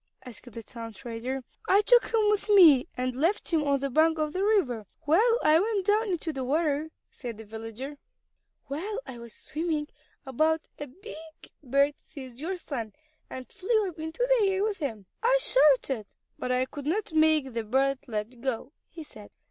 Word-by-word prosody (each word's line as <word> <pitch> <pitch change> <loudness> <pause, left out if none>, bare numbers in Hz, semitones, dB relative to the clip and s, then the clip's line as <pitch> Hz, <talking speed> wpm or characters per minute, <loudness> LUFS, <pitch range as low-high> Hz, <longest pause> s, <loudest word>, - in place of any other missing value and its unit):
asked 245 0 -11
the 230 +1 -8
town 230 -1 -8
trader. 245 +3 -5 0.3
"I 395 +2 +6
took 485 +3 +4
him 440 -2 +3
with 420 0 -1
me 330 -11 +7
and 255 0 -1
left 335 +8 0
him 320 - +4
on 280 -2 +1
the 275 -1 -2
bank 320 +4 +3
of 305 -1 -1
the 375 - -1
river 270 - +1
while 410 +10 +3
I 310 +1 +5
went 405 -1 0
down 425 +2 +2
into 340 -3 -2
the 265 -2 -4
water," 300 +2 0 0.2
said 235 -4 -7
the 220 - -10
villager. 225 +6 -8 0.7
"While 390 - -4
I 240 - -9
was 235 -1 -10
swimming 310 -2 -3 0.4
about 315 +5 0
a 290 - -5
big 295 +10 -11 0.5
bird 280 +1 +2
seized 260 -3 -11
your 360 +5 -3
son, 235 - -5 0.4
and 255 -1 -7
flew 415 +1 0
up 340 - -13
into 320 +10 -2
the 410 - +3
air 385 +1 0
with 420 -2 -1
him. 225 - -4 0.2
I - - +4
shouted, 270 - +3 0.3
but 250 - -2
I 255 +1 +2
could 285 +1 -8
not 370 +1 -1
make 310 -4 +3
the 230 -1 -2
bird 265 +4 +1
let 225 +2 -5
go," 260 +1 -3 0.2
he 325 -1 -9
said. 215 -8 -14
290 Hz, 185 wpm, -28 LUFS, 250-360 Hz, 0.7 s, me